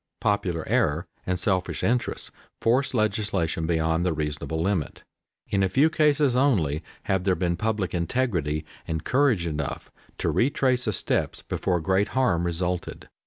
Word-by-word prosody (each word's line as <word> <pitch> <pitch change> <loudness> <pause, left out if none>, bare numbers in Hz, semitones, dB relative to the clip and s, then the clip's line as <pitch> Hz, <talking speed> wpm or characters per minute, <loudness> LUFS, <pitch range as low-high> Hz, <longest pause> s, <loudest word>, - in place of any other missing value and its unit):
Popular 90 -5 0
error - - +1 0.2
and 90 0 +1
selfish 95 -1 0
interests 125 +1 0 0.3
force 130 +3 +2
legislation 100 -7 0
beyond 80 0 +1
the 90 -2 +1
reasonable 75 +1 -3
limit. 90 -3 -1 0.5
In 100 - +1
a 95 - +2
few 140 +11 +3
cases 150 -4 +3
only 95 - +2 0.2
have 95 -2 0
there 95 -1 +2
been 85 -1 0
public 105 -3 -1
integrity 85 - -1 0.2
and 80 -1 -2
courage 125 -10 +2
enough 75 -4 -4 0.3
to - - 0
retrace 130 -1 +2
the 110 - 0
steps - - -1
before 90 -2 -1
great 95 +5 +2
harm 85 -10 +2
resulted. 90 +1 -3
95 Hz, 145 wpm, -25 LUFS, 85-120 Hz, 0.5 s, few